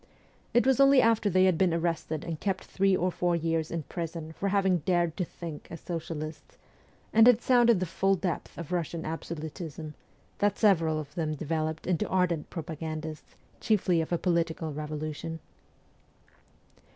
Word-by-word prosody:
It 240 - +3
was 265 0 +3
only 275 -1 +7
after 225 -3 +3
they 185 0 +4
had 185 -4 +2
been 180 -3 +3
arrested 165 -2 -2
and 165 -2 -5
kept 195 -2 -2
three 195 0 +2
or 180 +1 0
four 175 0 0
years 165 -1 -1
in 165 -2 -3
prison 165 0 -5
for 200 +5 -2
having 190 -2 +2
dared 170 0 +1
to 185 - 0
think 165 -3 -8
as 165 - -7
socialists, 155 -2 -6 0.6
and 225 +1 +7
had 245 -3 +7
sounded 240 -5 +5
the 185 - 0
full 195 +3 +1
depth 180 -2 -4
of 170 -4 -6
Eussian 170 -2 -2
absolutism, 160 -1 -6 0.5
that 205 0 +2
several 165 -7 +3
of 145 -2 -8
them 155 -3 -2
developed 160 +1 -2
into 180 -3 0
ardent 180 -4 0
propagandists, 155 -1 -6 0.2
chiefly 185 -6 +2
of 160 - -5
a 175 - +2
political 165 -3 -1
revolution. 155 +2 -5
170 Hz, 160 wpm, -29 LUFS, 160-190 Hz, 0.6 s, only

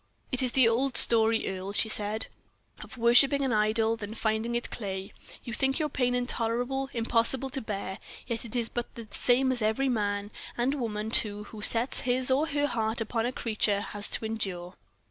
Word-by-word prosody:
"It 255 - +1
is 250 -2 +1
the 260 -3 +5
old 250 +3 +1
story, 225 -1 +6
Earle," 190 +1 -5
she 220 - +2
said, 215 0 -1 0.6
"of - - -11
worshiping 265 +4 +4
an 255 - 0
idol, 220 +1 +2
then 215 0 -7
finding 220 +1 -1
it 240 - -3
clay. 195 -3 -5 0.3
You 235 - -6
think 270 +2 0
your 305 -2 -1
pain 250 -3 0
intolerable, 245 +2 -1
impossible 235 +3 0
to 270 - -4
bear; 195 -2 -5 0.3
yet 230 -2 -4
it 235 0 -6
is 235 -2 0
but 240 0 -6
the 230 -2 -9
same 260 +4 +2
as 250 -2 0
every 220 +6 +1
man, 205 -3 -2 0.3
and 245 +3 +1
woman, 220 -5 -3
too, 210 -2 +1
who 210 0 -11
sets 230 +4 +2
his 255 +1 +1
or 285 +4 +2
her 290 -1 0
heart 225 -4 -1
upon 225 +1 -1
a - - -2
creature 215 -4 0
has 205 0 -6
to - - 0
endure. 190 -5 -4
230 Hz, 190 wpm, -28 LUFS, 215-250 Hz, 0.6 s, story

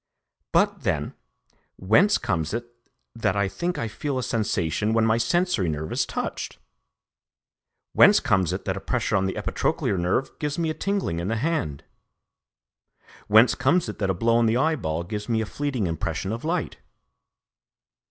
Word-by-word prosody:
But - - +2
then, - - -1 0.6
whence 130 - +4
comes 80 +4 -2
it 120 0 -4 0.5
that 110 -4 0
I 100 -1 +1
think 170 - -3
I 115 - -2
feel 135 +5 -3
a 130 - -2
sensation 105 -3 0
when 115 0 +3
my 115 +1 +2
sensory 125 - +1
nerve 80 0 -4
is - - 0
touched? - - -4 1.4
Whence 205 - +7
comes 95 - +1
it - - -4
that - - -1
a - - -4
pressure - - -1
on 95 -1 +2
the 95 - -4
epitrochlear 95 - -1
nerve 90 +10 0
gives 150 -1 -2
me 165 -2 0
a - - -3
tingling 190 - -2
in 85 - -3
the 115 - 0
hand? 115 - -2 1.4
Whence 110 +4 +6
comes 160 +4 +2
it 105 - -7
that 100 -2 0
a 95 - +1
blow 115 +5 +2
on 120 -1 +3
the 110 +2 +2
eyeball 120 - 0
gives 105 +5 -6
me 115 -1 +1
a 110 - -1
fleeting 135 -3 -2
impression 85 +3 -3
of 115 +1 -4
light? 165 +1 -2
115 Hz, 170 wpm, -25 LUFS, 95-145 Hz, 1.4 s, Whence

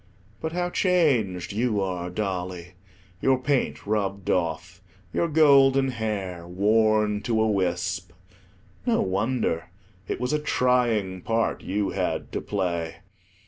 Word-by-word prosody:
But 160 0 -4
how 175 0 -1
changed 130 - +1
you 110 -1 +1
are, 90 -2 -2
Dolly: 90 -2 -4 0.5
your 135 -1 +3
paint 130 +1 -1
rubbed 100 -2 -1
off, 85 +1 -2 0.3
your 170 - +1
golden 135 -4 +5
hair 100 -7 -4
worn 105 +2 +2
to 115 -1 0
a 110 - +3
wisp. 90 -2 -1 0.8
No 235 - +3
wonder; 95 -3 -1 0.4
it - - -3
was 125 +3 -1
a 150 - +2
trying 120 -9 +1
part 115 +3 0
you 100 +1 -1
had - - -2
to - - -3
play. 85 -5 -2
105 Hz, 125 wpm, -25 LUFS, 90-125 Hz, 0.8 s, golden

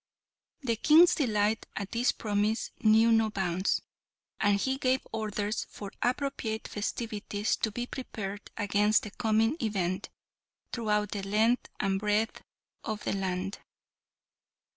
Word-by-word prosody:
The 235 -5 0
King's 320 +8 +7
delight 215 -5 +1
at 200 -2 -4
this 240 +2 +2
promise 210 +1 -1
knew 220 +1 +5
no 225 -1 +4
bounds, 185 -2 0 0.6
and 205 0 +3
he 265 +4 0
gave 260 -1 +1
orders 210 -1 -2
for 200 -2 -8
appropriate 245 -4 -1
festivities 210 -1 -2
to 220 - -1
be 240 +3 -3
prepared 205 -6 -6
against 205 0 +3
the 210 - -7
coming 225 +4 +1
event 190 -4 -1 0.6
throughout 210 -3 0
the 205 - -3
length 215 +5 +2
and 195 0 +1
breadth 210 +2 0 0.4
of 215 -2 -4
the - - -1
land. 190 0 -2
215 Hz, 125 wpm, -29 LUFS, 205-230 Hz, 0.6 s, King's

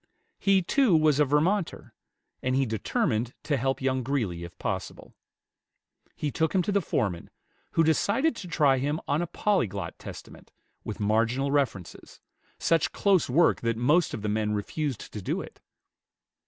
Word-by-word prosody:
He, 195 -2 +3
too, 235 - +3
was 155 -2 +3
a 150 - +5
Vermonter, 165 +7 0 0.5
and 130 0 0
he 135 0 +2
determined 115 - -1
to 150 - 0
help 135 +1 -1
young 130 -1 +1
Greeley, 115 -10 -2
if 85 0 -10
possible. - - -5 1.0
He 150 - -3
took 160 +4 0
him 185 - +3
to 205 - -1
the 200 0 +2
foreman, 100 - -2 0.4
who 165 - +4
decided 205 - +2
to 180 - -7
try 145 -6 +3
him 145 +4 -1
on 145 +3 +1
a 175 - -2
Polyglot 190 - -1
Testament, - - -11 0.3
with 110 - -6
marginal 115 +6 +1
references, 125 -11 -2 0.4
such 165 -2 +1
close 195 -8 +2
work 165 +8 +3
that 115 -1 -1
most 150 +9 +2
of 105 - -7
the - - -1
men 105 0 0
refused 130 +4 -4
to 105 - -5
do - - -2
it. - - -10
140 Hz, 160 wpm, -27 LUFS, 115-165 Hz, 1.0 s, a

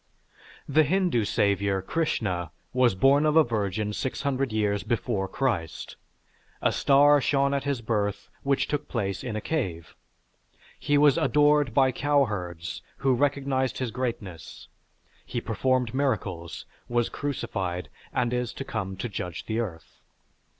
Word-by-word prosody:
The 150 +2 +4
Hindu 160 - +2
Savior, 100 -2 +1
Krishna, 95 - -1 0.2
was 125 -5 +3
born 135 +9 +4
of 155 0 +2
a 160 - +8
virgin 105 -3 -2
600 135 +1 -1
years 105 -2 +1
before 100 -4 -1
Christ. 105 -10 -2 0.6
A - - +2
star 145 +1 +5
shone 140 +1 +2
at 140 0 -1
his 140 -4 -1
birth 105 -3 -1
which 140 0 +1
took 145 0 -2
place 100 -3 -2
in 120 -4 -4
a 110 - -2
cave. 95 - -3 0.8
He 145 - +2
was 145 -1 +5
adored 145 -4 +3
by 135 -2 +5
cowherds 105 - -1 0.2
who 135 -1 +2
recognized 135 -1 0
his 125 -3 -2
greatness, 110 -10 -5 0.6
he 120 - -3
performed 125 +1 0
miracles, 95 - -2 0.2
was 120 -1 +1
crucified, 95 - -3 0.2
and 120 0 0
is 125 -1 -1
to - - -5
come 95 -6 -4
to 100 - -3
judge 90 -5 -5
the 110 +1 -2
earth. 85 - -6
120 Hz, 135 wpm, -27 LUFS, 100-140 Hz, 0.8 s, a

